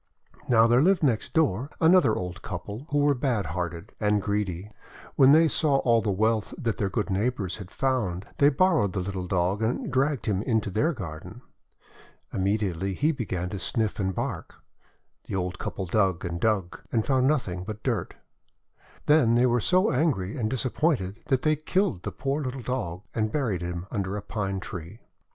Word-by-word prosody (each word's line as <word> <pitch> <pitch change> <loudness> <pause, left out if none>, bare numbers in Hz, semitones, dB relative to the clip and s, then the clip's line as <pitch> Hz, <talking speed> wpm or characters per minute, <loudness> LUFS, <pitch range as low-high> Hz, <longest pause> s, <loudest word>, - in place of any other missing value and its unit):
Now, 115 -2 +6
there 120 +2 +4
lived 185 +2 +3
next 120 -7 +1
door 140 - +1
another 160 -9 +5
old 90 -1 -5
couple, 105 - -6
who 145 - 0
were 145 0 +4
bad 125 -6 0
hearted 85 +2 -4
and 105 -1 +2
greedy. 100 -1 -2 0.4
When 135 0 +7
they 160 +2 +6
saw 150 -2 +2
all 115 -4 +3
the 105 - -2
wealth 110 +2 0
that 115 -1 -2
their 100 -3 0
good 105 +1 -2
neighbours 100 -1 -1
had 100 -4 -9
found, 105 -10 -1
they 145 - +6
borrowed 150 - +2
the 95 - -1
little 95 -1 -4
Dog, 95 +3 0
and 115 +3 -1
dragged 135 -2 +1
him 100 -2 0
into 110 -3 0
their 145 - +2
garden. 85 - -8 0.9
Immediately 95 -1 -1
he 150 - +2
began 95 - -3
to 100 - -4
sniff 110 +1 -1
and 95 -2 -1
bark. - - -4 0.7
The - - -4
old 90 0 -3
couple 95 - -4
dug 95 -2 +1
and 85 0 -3
dug, 105 -6 0
and 110 -2 +1
found 130 -1 +2
nothing 95 -12 0
but 105 +2 -7
dirt. - - -2 0.9
Then 150 -7 +4
they 120 +1 +4
were 120 -1 +2
so 185 - +3
angry 125 - 0
and 110 -4 -1
disappointed 125 - 0
that 130 -2 +1
they 155 0 +3
killed 155 - 0
the - - -4
poor 140 +2 -2
little 130 -2 -4
Dog, 100 -9 -3
and 110 -1 -1
buried 115 - -1
him 85 0 -4
under 100 -2 -2
a 100 - -6
Pine 100 -3 -3
Tree. 90 +3 -8
110 Hz, 180 wpm, -26 LUFS, 95-130 Hz, 0.9 s, When